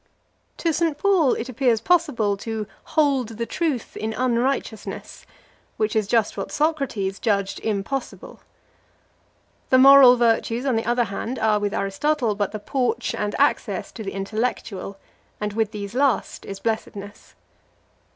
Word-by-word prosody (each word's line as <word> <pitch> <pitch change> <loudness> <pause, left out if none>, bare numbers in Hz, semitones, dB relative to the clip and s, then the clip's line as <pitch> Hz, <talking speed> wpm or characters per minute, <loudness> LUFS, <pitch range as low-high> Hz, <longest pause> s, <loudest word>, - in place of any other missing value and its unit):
To 330 -2 0
St. 325 -2 0
Paul 360 -7 +3
it 230 - -4
appears 250 -2 +1
possible 265 - +2
to 220 +1 -4 0.2
"hold 270 -8 +1
the 230 - -2
truth 300 -3 -2
in 220 +1 -3
unrighteousness,"+ 245 -2 -2 0.5
which 215 0 0
is 215 -2 +1
just 225 -1 +1
what - - -5
Socrates 275 -11 -1
judged 200 -3 0
impossible. 220 +5 -4 1.3
The 260 - +5
moral 270 -1 +9
virtues, 235 +1 +1
on 260 -4 +1
the 225 - -1
other 240 0 +2
hand, 225 +4 -4
are 215 -1 +2
with 205 -1 -1
Aristotle 230 +5 0
but 205 -1 -2
the 215 - -4
porch 250 +4 -1
and 210 0 -2
access - - 0
to 230 - -9
the 195 - -5
intellectual, 200 -1 -3 0.4
and 210 -1 -3
with 220 -1 0
these 205 -1 -7
last 265 0 0
is 195 -1 -6
blessedness. 205 -2 -5
230 Hz, 140 wpm, -23 LUFS, 210-270 Hz, 1.3 s, moral